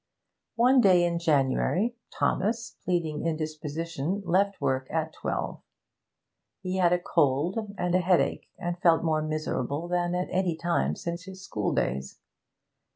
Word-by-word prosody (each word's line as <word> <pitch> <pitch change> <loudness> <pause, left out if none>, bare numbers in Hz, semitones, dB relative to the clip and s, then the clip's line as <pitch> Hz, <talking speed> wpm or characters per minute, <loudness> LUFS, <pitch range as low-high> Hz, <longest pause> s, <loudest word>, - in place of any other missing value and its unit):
One 250 +2 +5
day 185 -5 +5
in 170 -1 0
January, 165 - +1 0.2
Thomas, 220 +5 -1
pleading 165 -4 -1
indisposition, 160 +2 -3
left 200 +3 +2
work 130 -2 0
at 160 0 -2
twelve. - - -3 1.0
He 185 0 -3
had 175 -2 +4
a 180 - +4
cold 175 - 0
and 180 -1 -1
a 185 - +5
headache, 180 -1 +1
and 175 0 -3
felt 165 -2 +4
more 155 -2 +1
miserable 155 0 -2
than 175 0 0
at 180 +1 -1
any 180 -3 +1
time 75 - 0
since 170 - -5
his 190 -1 -10
school 105 -2 -1
days. 65 +2 -2
170 Hz, 140 wpm, -27 LUFS, 155-185 Hz, 1.0 s, One